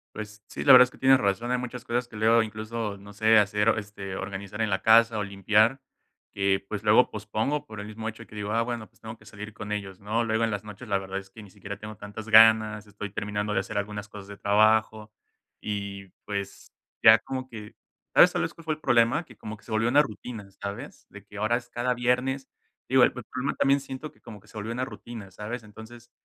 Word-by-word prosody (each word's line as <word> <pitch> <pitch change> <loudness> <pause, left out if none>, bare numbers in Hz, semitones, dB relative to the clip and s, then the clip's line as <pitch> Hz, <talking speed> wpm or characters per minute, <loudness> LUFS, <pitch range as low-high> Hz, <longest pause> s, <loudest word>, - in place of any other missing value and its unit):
Pues, 105 0 -8
sí, - - -6
la - - +8
verdad 125 0 +11
es 125 - -4
que - - -18
tienes 135 0 +6
razón. 105 +4 0
Hay 125 - +2
muchas 125 0 -6
cosas 120 +1 -1
que 115 - -14
luego, 110 +2 +4
incluso, 110 -1 -5
no 100 +1 -13
sé, 110 +1 +5
hacer, 105 +2 +2
este, 100 -2 -7
organizar 100 +2 -5
en 110 - +1
la 95 -1 -1
casa 115 0 +5
o 105 - -1
limpiar, 105 +5 +2 0.5
que, 100 -1 0
pues, 105 -1 -4
luego 110 +4 +5
pospongo 110 +8 -2
por 110 -7 -9
el 105 - -6
mismo 110 +1 -6
hecho 115 +1 -7
que - - -14
digo: 105 0 -4
"Ah, 115 +1 +2
bueno, 115 -2 -4
pues, - - -31
tengo 110 +1 -8
que 110 - -21
salir 105 0 -9
con 105 -2 -7
ellos", 100 -3 -4
¿no? 110 +3 -1
Luego 110 0 0
en 115 - +1
las 105 0 -3
noches 105 +3 -10
la 100 -2 +1
verdad 95 0 -5
es 95 0 -8
que 110 - -12
ni 105 - -13
siquiera 100 0 -8
tengo 105 +1 -9
tantas 105 +2 -9
ganas, 110 -1 +6
estoy 105 0 -7
terminando 105 0 -3
de 95 - +1
hacer 100 +3 -8
algunas 105 0 -5
cosas 105 -2 -11
de 100 0 -10
trabajo. 110 +1 +2 0.5
Y, 100 -2 -5 0.2
pues, 100 -1 -5 0.4
ya - - +9
como 130 -1 -6
que 110 -3 -10 0.4
¿sabes, - - +8
sabes - - -2
cuál 165 - -15
fue 160 - 0
el - - -21
problema? 120 +3 +3
Que 120 - -16
como 105 0 -8
que - - -24
se - - -11
volvió 110 +2 +1
una 145 +4 +5
rutina, 110 -3 -8
¿sabes? 100 +8 -7
De 100 -1 -12
que 105 - -12
ahora 110 +3 +1
es 120 -1 -10
cada 125 +1 -1
viernes 125 +2 0 0.4
Digo, 130 0 +5
el - - +5
el 125 - -7
problema 130 +2 -2
también 140 +1 +3
siento 135 +2 -8
que - - -28
como 110 -3 -11
que - - -23
se - - -12
volvió 105 +2 -4
una 125 +2 -2
rutina, 115 -6 -10
¿sabes? 110 +5 -6
Entonces, 110 +3 -13
110 Hz, 240 wpm, -26 LUFS, 105-120 Hz, 0.5 s, verdad